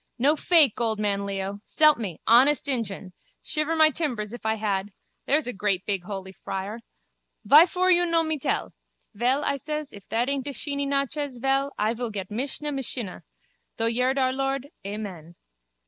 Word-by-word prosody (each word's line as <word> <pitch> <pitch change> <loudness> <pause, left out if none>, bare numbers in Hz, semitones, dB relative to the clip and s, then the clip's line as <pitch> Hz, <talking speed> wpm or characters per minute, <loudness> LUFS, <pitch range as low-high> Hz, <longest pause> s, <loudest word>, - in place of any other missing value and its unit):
No 280 +5 +3
fake, 305 - +4
old 220 -2 +1
man 200 -1 -1
Leo. 195 0 -4
S'elp 305 -4 +4
me, 195 -8 -5
honest 270 +6 +5
injun. 205 -8 -1 0.3
Shiver 305 +1 0
my 315 -1 +6
timbers 240 -9 -3
if 240 -2 -6
I 220 - +2
had. 205 -2 -2 0.4
There's 300 +2 +2
a 250 - -3
great 195 -1 -1
big 195 -4 -2
holy 190 -1 -6
friar. 195 +3 -6 0.7
Vyfor 360 +5 +6
you 350 0 +3
no 335 -1 +3
me 315 -2 -2
tell? - - -2 0.4
Vel, 250 +7 +1
I 280 - 0
ses, 300 +1 -5
if 200 -2 -13
that 235 +2 0
aint 275 -1 -2
a 285 - -3
sheeny 280 0 -2
nachez, 280 -1 -2
vel, 270 +2 +1
I 215 +2 +1
vil 240 0 -4
get 195 -3 -6
misha 275 +6 -2
mishinnah. 250 -7 -4 0.6
Through 230 0 +1
yerd 250 +3 +1
our 260 -1 +2
lord, 270 +1 -2
Amen. 195 -5 -7
250 Hz, 175 wpm, -25 LUFS, 205-285 Hz, 0.7 s, my